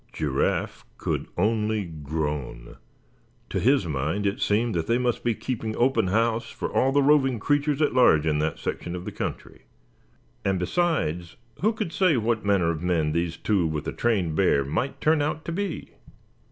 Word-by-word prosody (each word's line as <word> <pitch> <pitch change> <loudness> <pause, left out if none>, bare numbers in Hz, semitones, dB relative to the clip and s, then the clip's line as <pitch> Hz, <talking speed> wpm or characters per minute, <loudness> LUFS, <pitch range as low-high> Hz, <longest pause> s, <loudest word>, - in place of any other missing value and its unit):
Giraffe 70 -3 -1
could - - -2
only 105 +1 +1
groan. 75 -6 -5 0.7
To 95 - 0
his 125 +2 +3
mind 80 +6 -2
it 100 0 -1
seemed 115 +3 +1
that 85 -2 -2
they 115 - +2
must 125 -1 -1
be 120 -2 +1
keeping 110 -3 -4
open 125 -5 +2
house 115 +3 +1
for - - -5
all 130 - +3
the 140 +1 +3
roving 135 -4 +3
creatures 145 +4 +1
at 150 - +1
large 80 -12 +5
in 75 -2 +1
that 75 0 -1
section 85 0 -4
of 90 - -7
the - - -4
country. - - -6 0.8
And 95 -1 +1
besides, 90 - -1 0.3
who 215 +4 +3
could 215 -7 -4
say 180 -7 +3
what 110 -1 0
manner 95 -5 +2
of 80 -1 -5
men 85 -4 +1
these 85 +1 -1
two 95 -6 +1
with 75 -2 -3
the - - -4
trained 95 -9 0
bear 75 -6 +3
might 120 - -2
turn 155 -1 +3
out 150 +2 -2
to - - -3
be? 190 -1 -3
105 Hz, 180 wpm, -25 LUFS, 80-130 Hz, 0.8 s, large